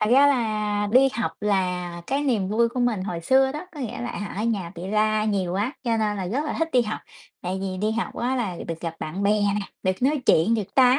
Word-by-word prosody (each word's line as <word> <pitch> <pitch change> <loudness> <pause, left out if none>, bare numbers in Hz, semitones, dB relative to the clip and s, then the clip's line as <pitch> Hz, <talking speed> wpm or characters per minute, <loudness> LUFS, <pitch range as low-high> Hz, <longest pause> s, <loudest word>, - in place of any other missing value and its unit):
Thật 215 - +1
ra 275 +3 +7
là 215 -5 +1
đi 270 +2 +6
học 230 - -1
là 180 -4 -1
cái 275 +2 0
niềm 225 -9 +1
vui 230 +3 +3
của 245 +2 -3
mình 235 -6 +1
hồi 175 -4 -4
xưa 265 +9 +3
đó, 300 +5 -6
có 295 - -7
nghĩa 240 -1 -4
là, 240 - -3
à, 205 - -5
ở - - -1
nhà 195 -7 -1
bị 175 +2 -6
la 215 +1 +2
nhiều 195 -5 0
quá, 210 +8 0
cho 230 -2 +1
nên 210 -2 0
là 190 -2 -3
rất 275 +10 -1
là - - -2
thích 325 0 +1
đi 250 -1 +5
học. 215 -1 -4 0.4
Tại 185 +2 -2
vì 190 -1 -3
đi 210 +3 0
học 230 +1 -2
á 255 +2 0
là 200 -8 -2
được 165 -1 -4
gặp 165 -1 -4
bạn 185 +6 -4
bè 200 - +3
nè, 205 0 +1 0.2
được 185 +4 -1
nói 285 +2 +2
chuyện, 205 +9 +5
được 205 -3 -3
tám 255 0 +6
215 Hz, 260 wpm, -24 LUFS, 190-245 Hz, 0.4 s, ra